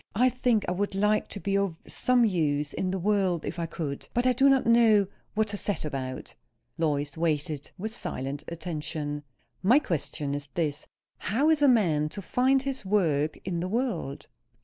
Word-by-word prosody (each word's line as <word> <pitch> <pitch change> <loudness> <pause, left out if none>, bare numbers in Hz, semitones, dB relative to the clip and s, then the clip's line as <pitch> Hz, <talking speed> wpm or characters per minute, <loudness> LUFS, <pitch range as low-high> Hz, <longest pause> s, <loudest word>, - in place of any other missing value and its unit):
I 250 +4 +5
think 245 -4 +1
I - - 0
would 195 +2 -1
like 210 +2 +2
to 200 - -7
be 195 0 -1
of 195 -5 -1
some 250 -2 +2
use 150 -7 0
in 185 - -1
the 190 - -1
world, 190 -3 +1
if - - -4
I 165 - -1
could. 145 -4 -5
But 240 +1 +2
I 255 - +4
do 270 +3 +5
not 270 -1 +3
know 225 -3 +5 0.3
what 215 0 +1
to 205 - -1
set 205 -5 -2
about." 130 -3 -5 0.4
Lois 145 -3 -1
waited, 155 -2 -1
with 215 +4 -4
silent 140 - -4
attention. 155 -3 -4 0.4
"My 230 +8 +5
question 150 - -2
is 145 0 -4
this: 150 -3 -2 0.3
How 280 +9 +2
is 310 -2 +2
a 290 - +6
man 165 - +3
to - - -3
find 260 +6 +2
his 270 -3 -3
work 160 -7 +1
in 175 -2 -2
the 180 +2 -2
world?" 210 - -2
185 Hz, 185 wpm, -28 LUFS, 150-225 Hz, 0.4 s, a